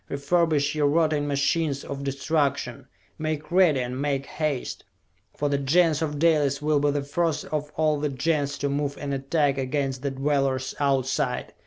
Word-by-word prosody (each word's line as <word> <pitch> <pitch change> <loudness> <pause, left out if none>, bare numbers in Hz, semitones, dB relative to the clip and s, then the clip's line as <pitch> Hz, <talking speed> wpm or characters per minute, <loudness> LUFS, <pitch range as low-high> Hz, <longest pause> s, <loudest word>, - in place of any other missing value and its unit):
Refurbish 145 +1 +1
your 150 -2 +2
rotting 155 -1 +2
machines 140 +1 0
of 140 0 -6
destruction! 140 +1 -1 0.3
Make 155 0 -3
ready, 175 -7 +4
and 125 +2 -4
make 140 -1 -1
haste! 150 -5 -3 0.5
For 145 - 0
the 140 -1 0
Gens 160 +2 +3
of 150 -2 -2
Dalis 145 -3 +2
will 150 0 +2
be 145 0 +2
the 145 0 -1
first 160 +2 -1
of 150 -1 -3
all 155 -1 +2
the 150 0 -1
Gens 145 +1 -1
to 140 - -1
move 140 0 -2
in 140 -1 -4
attack 140 0 +1
against 135 0 -2
the 140 - -1
Dwellers 135 -1 0
Outside! 130 -2 0
145 Hz, 165 wpm, -25 LUFS, 140-155 Hz, 0.5 s, ready